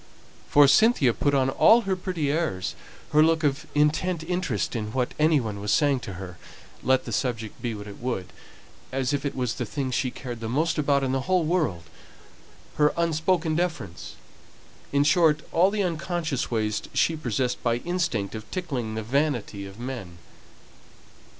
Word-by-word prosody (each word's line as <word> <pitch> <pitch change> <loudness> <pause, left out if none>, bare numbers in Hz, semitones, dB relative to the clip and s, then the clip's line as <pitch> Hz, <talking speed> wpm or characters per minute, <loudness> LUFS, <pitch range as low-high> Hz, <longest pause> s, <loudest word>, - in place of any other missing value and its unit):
For 145 -1 +7
Cynthia 145 - +5
put 145 +3 +1
on 135 -1 +2
all 225 - +6
her 195 -3 -1
pretty 180 -6 -2
airs 145 - -1 0.4
her 150 - +5
look 160 0 +3
of 140 0 0
intent 160 +3 +1
interest 170 - -2
in 105 -1 -3
what 125 -2 -1
any 155 -1 +4
one 110 -5 -4
was 105 0 -1
saying 145 -3 +3
to 100 - -7
her, 90 -2 -9 0.4
let 130 0 +2
the - - -5
subject 115 -5 -3
be 120 -2 -2
what 105 -1 -8
it 100 -1 -10
would, 115 -7 -4 0.6
as 130 +1 -1
if 140 0 -1
it - - -5
was 125 -3 -1
the 125 - -3
thing 135 0 -3
she 130 +1 0
cared 120 -2 -7
most 150 +9 0
about 140 -2 +2
in 130 - 0
the 135 0 -2
whole 185 -2 +3
world; 155 - 0 0.9
her 150 0 +3
unspoken 165 0 +1
deference; 150 - -3 0.8
in 140 0 +3
short, 155 0 +4
all 180 +3 +4
the 205 0 -1
unconscious 165 -4 -2
ways 110 -2 -1
she 165 - +3
possessed 125 -3 -2
by 115 -1 +1
instinct 125 - -2
of 110 -1 -8
tickling 130 -12 -3
the 110 - -3
vanity 120 -6 -1
of 95 +3 -12
men. 120 -9 -6
140 Hz, 170 wpm, -26 LUFS, 115-160 Hz, 0.9 s, For